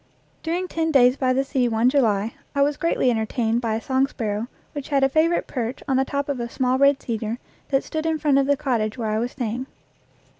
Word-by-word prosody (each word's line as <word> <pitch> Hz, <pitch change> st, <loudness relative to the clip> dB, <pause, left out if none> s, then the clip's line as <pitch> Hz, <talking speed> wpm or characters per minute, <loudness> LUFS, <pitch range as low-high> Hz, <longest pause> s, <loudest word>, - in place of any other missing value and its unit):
During 350 Hz, +3 st, -2 dB
ten 325 Hz, -2 st, -1 dB
days 255 Hz, -4 st, +5 dB
by 260 Hz, -2 st, +1 dB
the 265 Hz, +1 st, +2 dB
sea 265 Hz, -2 st, 0 dB
one 225 Hz, +1 st, +2 dB
July 230 Hz, -5 st, +2 dB, 0.2 s
I 280 Hz, -, +4 dB
was 290 Hz, +1 st, +1 dB
greatly 290 Hz, -5 st, +1 dB
entertained 225 Hz, +1 st, 0 dB
by 225 Hz, -2 st, -1 dB
a 225 Hz, -, -3 dB
song 265 Hz, 0 st, +2 dB
sparrow 220 Hz, -4 st, -3 dB, 0.3 s
which 290 Hz, -2 st, -6 dB
had 275 Hz, -2 st, +2 dB
a 270 Hz, -, +4 dB
favorite 320 Hz, +4 st, +2 dB
perch 245 Hz, -1 st, -4 dB
on 270 Hz, -, +1 dB
the 265 Hz, -, +3 dB
top 280 Hz, +1 st, -2 dB
of 280 Hz, -3 st, -2 dB
a 235 Hz, 0 st, -3 dB
small 255 Hz, +1 st, 0 dB
red 280 Hz, 0 st, +5 dB
cedar 225 Hz, -1 st, -3 dB, 0.3 s
that 270 Hz, -1 st, +2 dB
stood 315 Hz, 0 st, -3 dB
in 320 Hz, -1 st, +1 dB
front 290 Hz, -3 st, +3 dB
of 275 Hz, -, +1 dB
the 285 Hz, 0 st, +3 dB
cottage 240 Hz, -6 st, -1 dB
where 220 Hz, -3 st, -2 dB
I 215 Hz, -, 0 dB
was 240 Hz, +2 st, -2 dB
staying. 245 Hz, +1 st, -3 dB
260 Hz, 230 wpm, -23 LUFS, 230-280 Hz, 0.3 s, days